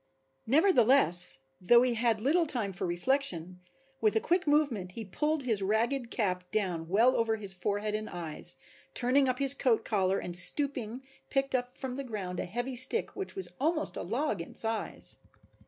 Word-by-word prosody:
Nevertheless, 250 - +4 0.2
though 235 +6 +5
he 250 -1 +1
had 230 -2 0
little 325 +7 +2
time 225 -9 -1
for 180 - -4
reflection, 180 - 0 0.4
with 215 0 +2
a - - +4
quick 355 +7 0
movement 265 -12 0
he 225 +1 -6
pulled 300 - -2
his 225 -5 0
ragged 230 +5 0
cap 180 -6 -2
down 175 -6 -2
well 230 +7 +3
over 225 -1 +1
his 200 -3 -1
forehead 205 +3 -3
and 215 0 -4
eyes, 165 -3 +1 0.4
turned 260 +2 +3
up 255 - -1
his 275 0 +3
coat 250 -5 0
collar 195 -3 0
and 175 - -5
stooping 255 +3 -1 0.3
picked 275 -1 -1
up 250 0 -2
from 260 -1 -6
the 275 - -4
ground 195 -7 -5
a - - -3
heavy 245 +7 -4
stick 265 - +5
which 390 0 -6
was 385 - -3
almost 310 +2 0
a - - -4
log 225 - -2
in 170 - -10
size. 225 -1 -2
230 Hz, 175 wpm, -29 LUFS, 195-270 Hz, 0.4 s, though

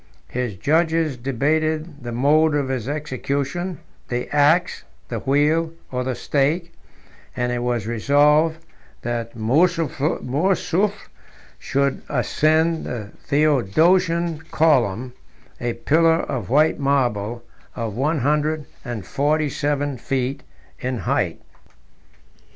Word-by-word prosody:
His 125 -5 -3
judges 160 - +1
debated 150 +5 -1
the 120 - -5
mode 150 +5 +3
of 140 -2 0
his 130 -2 -2
execution, 150 +4 -3 0.3
the 120 0 -2
axe, 150 +5 +3 0.3
the - - -3
wheel, 155 +4 +1 0.2
or 125 0 -1
the 130 -1 -2
stake; 155 +7 0 0.6
and 125 0 -1
it 120 0 -1
was 120 -3 -1
resolved 145 +7 +3 0.5
that 120 -1 -3
Mourzoufle 155 +5 +1
17 180 +7 +1 0.7
should 140 0 0
ascend 155 +5 +2
the 110 -4 -5 0.2
Theodosian 160 - +2
column, 125 -6 +2 0.5
a 120 -1 -1
pillar 160 +7 +3
of 110 -5 -4
white 150 +5 +3
marble 120 -5 0 0.3
of 115 -3 -3
one 145 +6 0
hundred 150 +2 +1 0.2
and 120 -5 -5
forty 150 +2 +1
seven 145 -2 -1
feet 135 +3 -2 0.4
in 130 0 -2
height. - - -1
145 Hz, 110 wpm, -22 LUFS, 125-155 Hz, 0.7 s, mode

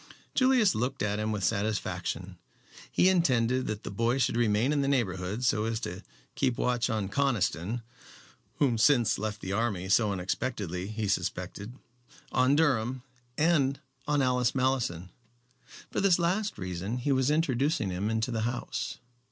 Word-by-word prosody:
Julius 255 -7 +4
looked 125 +3 -2
at 105 0 -1
him 110 +1 -1
with 105 -3 -2
satisfaction. 105 +2 -2 0.5
He 180 - +4
intended 130 -9 +2
that 105 -1 -4
the - - -5
boy 115 +5 +1
should 125 -3 +1
remain 115 +3 +2
in 145 - +1
the 135 - 0
neighborhood 105 -4 -1
so 110 -2 +2
as 115 -1 -1
to 90 -3 -5 0.3
keep 125 -2 0
watch 120 -2 +1
on 110 -3 -1
Conniston 110 -2 0 0.7
whom 125 -6 +1
since 120 -3 +4
he - - -7
left 105 -1 -3
the 95 - -4
army 100 -4 -1
so 105 +1 +4
unexpectedly 95 -1 -3
he 110 0 -3
suspected 105 +3 -3 0.6
on 130 +2 +3
Durham, 130 -5 +1 0.3
and 145 -4 +2 0.3
on 145 -2 +2
Alice 125 -1 +1
Malleson. 125 -10 0 0.8
For - - -1
this 195 -3 +4
last 185 +5 0
reason 90 +5 -4
he 125 +3 -1
was 130 0 +2
introducing 145 - +1
him 95 +4 -2
into 110 +2 -1
the 115 -1 -1
house. 120 +2 -3
120 Hz, 155 wpm, -29 LUFS, 105-135 Hz, 0.8 s, Julius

